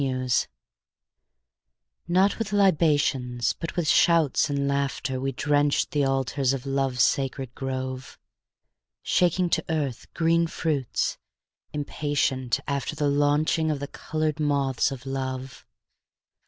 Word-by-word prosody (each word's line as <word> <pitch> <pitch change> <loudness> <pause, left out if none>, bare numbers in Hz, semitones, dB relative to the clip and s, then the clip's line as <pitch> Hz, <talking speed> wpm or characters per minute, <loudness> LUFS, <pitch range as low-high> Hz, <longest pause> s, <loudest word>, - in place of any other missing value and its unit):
III 130 -1 -2 1.8
Not 185 +5 +2
with 220 -2 -3
libations, 145 -10 +2
but 165 - -6
with 175 -3 -1
shouts 160 -3 +4
and 140 -1 0
laughter 140 -2 -1
We 135 +1 -1
drenched 145 +2 +1
the 145 -2 +1
altars 135 0 0
of 135 -1 -4
Love's 135 -2 +1
sacred 135 -2 -1
grove, 130 0 -5 0.9
Shaking 180 0 +2
to - - +1
earth 145 -7 -3
green 165 0 +2
fruits, 150 -6 -1 0.5
impatient 145 -4 -1
after 140 +1 -2
The 150 -2 +1
launching 145 +2 +2
of 150 -2 -1
the 140 - -4
colored 155 0 -3
moths 140 -4 +1
of 130 -1 -8
Love. 130 -1 -5
140 Hz, 115 wpm, -25 LUFS, 130-155 Hz, 1.8 s, shouts